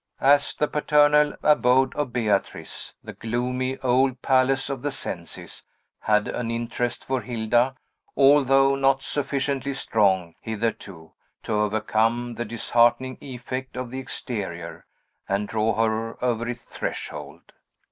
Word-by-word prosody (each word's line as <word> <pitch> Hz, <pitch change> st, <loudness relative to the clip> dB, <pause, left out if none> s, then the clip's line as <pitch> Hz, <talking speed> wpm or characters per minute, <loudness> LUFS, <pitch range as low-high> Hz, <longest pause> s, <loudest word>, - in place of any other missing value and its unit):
As 145 Hz, +1 st, +4 dB
the 150 Hz, -, +1 dB
paternal 150 Hz, 0 st, +3 dB
abode 130 Hz, -3 st, +4 dB
of 145 Hz, -4 st, -2 dB
Beatrice, 110 Hz, -5 st, -2 dB
the -, -, -8 dB
gloomy 125 Hz, +3 st, -2 dB
old 130 Hz, 0 st, +2 dB
palace 135 Hz, 0 st, +3 dB
of 135 Hz, -3 st, -4 dB
the 145 Hz, -, -1 dB
Cencis 85 Hz, -10 st, -6 dB, 0.4 s
had 105 Hz, -1 st, +2 dB
an 120 Hz, -2 st, -3 dB
interest 120 Hz, +1 st, -3 dB
for 130 Hz, -1 st, -1 dB
Hilda, 120 Hz, +2 st, +1 dB, 0.4 s
although 135 Hz, -1 st, +5 dB
not 135 Hz, 0 st, +2 dB
sufficiently 140 Hz, -1 st, -1 dB
strong, 95 Hz, -9 st, +1 dB
hitherto, 105 Hz, -7 st, -4 dB, 0.3 s
to -, -, -3 dB
overcome 110 Hz, +3 st, +1 dB
the 120 Hz, +1 st, -4 dB
disheartening 120 Hz, +3 st, +1 dB
effect 130 Hz, 0 st, -6 dB
of 125 Hz, -2 st, -4 dB
the 130 Hz, -, -4 dB
exterior, 95 Hz, -10 st, -6 dB, 0.4 s
and 100 Hz, +1 st, 0 dB
draw 110 Hz, +1 st, 0 dB
her 115 Hz, +2 st, -1 dB
over 115 Hz, -1 st, 0 dB
its 120 Hz, 0 st, -5 dB
threshold. 75 Hz, +3 st, -6 dB
120 Hz, 125 wpm, -24 LUFS, 110-135 Hz, 0.4 s, although